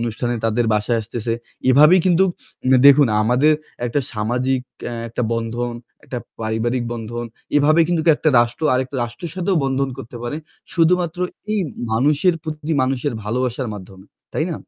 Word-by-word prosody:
অনুষ্ঠানে 120 +1 -2
তাদের 115 +1 +1
বাসায় 105 +2 +1
আসতেছে। 115 +1 -4 0.4
এভাবেই 150 +7 +7
কিন্তু 180 +1 +4 0.4
উম 130 - +4
দেখুন, 140 -1 +7 0.2
আমাদের 125 +7 +3 0.3
একটা 120 +4 0
সামাজিক 125 +4 0 0.3
অ্যা 120 - -4
একটা 120 +2 -3
বন্ধন, 115 +1 -2 0.3
একটা 125 - -5 0.2
পারিবারিক 115 +3 -1
বন্ধন। 120 +1 -5 0.3
এভাবে 155 +3 +4
কিন্তু 170 -1 +1 0.2
একটা 155 - +2
রাষ্ট্র 120 +5 -1
আরেকটা 130 +1 -2
রাষ্ট্রের 120 +8 -7
সাথেও 185 0 0
বন্ধন 135 0 0
করতে 120 -2 -9
পারে। 120 +5 -3 0.4
শুধুমাত্র 175 0 +2 0.3
এই 215 - +1 0.3
মানুষের 150 +9 +3
প্রতি 155 0 -4
মানুষের 130 +1 -1
ভালোবাসার 125 +3 -2
মাধ্যমে, 95 -1 -11 0.3
তাই - - +1
না? - - -2
125 Hz, 145 wpm, -20 LUFS, 115-150 Hz, 0.4 s, এভাবেই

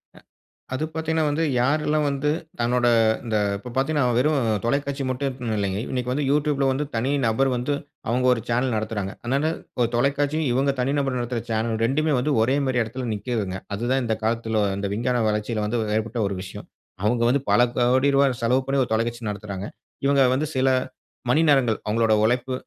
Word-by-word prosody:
அ - - -15 0.5
அது 130 - -2
பாத்தீங்கன்னா 160 0 0
வந்து, 155 +3 0 0.2
யாருல்லாம் 150 +3 +1
வந்து 140 +2 -1 0.3
தன்னோட 120 +1 +2 0.4
இந்த 110 -2 0 0.2
இப்போ 125 +5 -9
பாத்தீங்கன்னா 145 0 +1
வெறும் 145 +2 +2 0.3
தொலைக்காட்சி 140 +1 -1
மட்டும் 130 -3 -2
இல்லைங்க. 100 0 -1
இன்னைக்கு 125 -1 -2
வந்து 145 +1 -1
YouTubeல 145 -2 +1
வந்து 145 +3 -1
தனி 125 +5 0 0.2
நபர் 135 +5 +2
வந்து, 125 +4 -1 0.4
அவங்க 125 +2 +1
ஒரு 115 - -3
சேனல் 125 0 +1
நடத்துறாங்க. 105 -3 -3
அதுனால 140 +6 0 0.3
ஒரு 120 - +2
தொலைக்காட்சியும், 140 +4 +1
இவங்க 135 +2 +2
தனி 135 +3 0
நபர் 135 -2 -1
நடத்துற 120 0 -2
சேனல் 110 0 0
2மே 150 +4 +1
வந்து 145 +3 0
ஒரே 130 +4 +2
மாதிரி 125 -2 +1
இடத்துல 125 +2 -5
நிக்கிதுங்க. 105 -4 -3 0.2
அது 115 - -5
தான் 135 0 +2
இந்த 110 -1 0
காலத்துல 110 -1 0
இந்த 100 0 -2
விஞ்ஞான 120 0 0
வளர்ச்சியில 105 +1 -1
வந்து 115 +2 -1 0.2
ஏற்பட்ட 115 +2 -3
ஒரு 100 - -3
விஷயம். 95 - -9 0.4
அவங்க 115 +3 +1
வந்து 140 +1 +2
பல - - +5 0.2
கோடி 130 +3 +3
ரூபாய் 135 -3 +3
செலவு 125 +3 +3
பண்ணி 140 0 0
ஒரு 120 - -7
தொலைக்காட்சி 115 0 -1
நடத்துறாங்க. 100 -1 -6 0.4
இவங்க 140 -1 +4
வந்து 150 +3 0
சில 130 +1 +2 0.6
மணி 155 +6 +4
நேரங்கள் 125 -6 +3
அவங்களோட 110 0 +2
உழைப்பு, 125 +3 +1
125 Hz, 175 wpm, -24 LUFS, 115-140 Hz, 0.6 s, பல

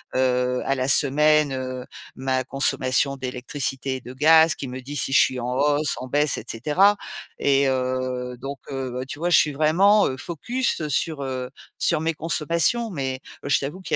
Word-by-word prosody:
heu, 125 -1 +1
à 135 - +1
la 130 0 -1
semaine, 150 +1 +3
heu, 130 -1 -5 0.3
ma 130 0 -1
consommation 135 0 +1
d'électricité 130 +1 -4
et 130 - -7
de 125 - -10
gaz, 160 +3 +5
qui 135 - -7
me 130 +1 -7
dit 145 +3 -6
si 135 - 0
je - - +7
suis 130 -1 0
en 125 +1 -3
hausse, 145 +2 +1
en 130 - -7
baisse 145 +2 +1
et - - -6
cetera 175 - +2 0.4
et 140 -1 +2
heu, 130 -1 -2
donc 140 +1 -6
heu, 130 -2 -4
tu 145 - -6
vois, 175 +2 -1
je 175 - +6
suis 150 -2 +1
vraiment, 185 +8 +4
heu, 130 - -5
focus 175 - -2
sur, 145 0 0
heu, 130 -1 -5 0.3
sur 155 -3 +1
mes 165 +1 0
consommations. 170 +8 +1
Mais, 130 -5 -4 0.2
je 145 - +2
t'avoue 145 +7 -5
qu'il 185 - -2
135 Hz, 185 wpm, -23 LUFS, 130-155 Hz, 0.4 s, je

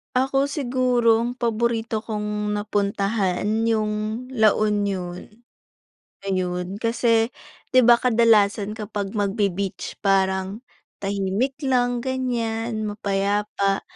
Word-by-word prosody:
Ako 270 +2 +2
siguro 245 -5 +2
ang 245 +2 -4
paborito 230 -2 -1
kong 210 -1 -3
napuntahan 200 -2 -1 0.2
'yung 215 +1 -1
La 220 -3 +5
Union, 200 -4 -1 1.0
ayun. 185 0 -2
Kasi 230 0 +2 0.5
di 255 - +7
ba, 240 0 +7
kadalasan 220 -4 +3
kapag 205 -2 -4
magbe-beach 200 -2 -2
parang 190 +1 0 0.4
tahimik 200 +7 -1
lang 245 -2 +2
ganiyan, 235 -3 -2
mapayapa. 200 -1 -1
215 Hz, 90 wpm, -23 LUFS, 200-235 Hz, 1.0 s, di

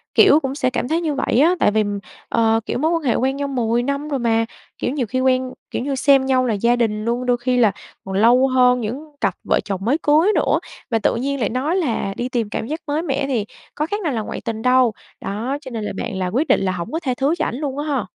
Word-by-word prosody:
kiểu, 295 - +7
cũng 270 -2 -3
sẽ 255 -4 +1
cảm 250 -1 -2
thấy 325 +3 0
như 315 -3 -1
vậy 260 -2 +1
á, 335 +6 +5
tại - - +4
vì, 215 0 +2 0.5
ờ, 225 -1 +3
kiểu, - - -2
mối 315 +4 +1
quan 330 -2 0
hệ 250 - +2
quen 265 +2 0
nhau 285 0 -2
10 240 -3 0
năm 280 +3 -2
rồi 275 - -1
mà, 230 -1 +2 0.3
kiểu, - - -2
nhiều 270 -4 -1
khi 255 +5 -1
quen, 255 0 +1 0.2
kiểu - - -2
như, 280 0 -1
xem 270 0 +4
nhau 260 -1 +2
là 230 - +1
gia 235 +4 +2
đình 220 -3 -1
luôn, 240 +2 -1
đôi 245 -1 +2
khi 250 +1 0
là 225 -5 +5 0.3
còn 190 0 -4
lâu 240 +5 +5
hơn 250 -1 +3
những 270 +8 -5
cặp 195 -4 +1
vợ - - +2
chồng 195 -2 -3
mới 265 +6 +2
cưới 315 +8 +4
nữa - - +2 0.3
và 225 - +2
tự - - +1
nhiên 275 +3 -2
lại 215 -5 0
nói 275 +8 -1
là 240 - -1
đi 245 - -2
tìm 235 -4 -1
cảm 220 - -4
giác 310 +4 -3
mới 295 +2 0
mẻ 275 -4 -1
thì 235 -7 -1 0.3
có 300 - -1
khác 410 +4 -3
nào 315 -7 -1
là 225 - -1
ngoại - - -6
tình 225 -1 -4
đâu. 250 -2 +4 0.3
Đó, 235 +8 -3
cho 260 - -9
nên 225 -2 -4
là - - -3
bạn 235 -5 -4
là 185 -1 -1
quyết 255 - 0
định - - +3
là 190 -1 0
hổng 180 +5 -5
có 320 - -1
tha 255 -3 0
thứ 280 +4 +2
cho - - 0
ảnh - - -3
luôn 280 0 -4
á 295 - -2
ha? 270 -7 -1
255 Hz, 275 wpm, -20 LUFS, 230-280 Hz, 0.5 s, kiểu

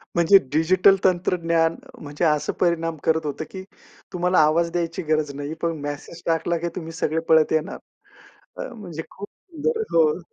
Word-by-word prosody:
म्हणजे 170 +3 +6
डिजिटल 185 +5 +4
तंत्रज्ञान 170 -2 +1 0.3
म्हणजे, 145 +3 -3
असं 150 -1 +1
परिणाम 165 -2 +1
करत 160 -1 +1
होतं, 145 +1 -3
की 190 -1 -7 0.5
तुम्हाला 180 0 +2
आवाज 165 +2 +3
द्यायची 170 -1 -2
गरज 155 -2 +1
नाही, 145 +2 -5
पण 165 -1 -1
मेसेज 145 +4 -7
टाकला, 165 +1 0
की 170 +1 -3
तुम्ही 165 -2 -6
सगळे 160 0 -1
पळत 160 -1 +5
येणार. 160 +5 -1 1.0
म्हणजे 175 -7 -7
खूप 205 +1 -9
सुंदर. 390 +6 -4
हो. 160 0 +3
165 Hz, 150 wpm, -23 LUFS, 155-175 Hz, 1.0 s, म्हणजे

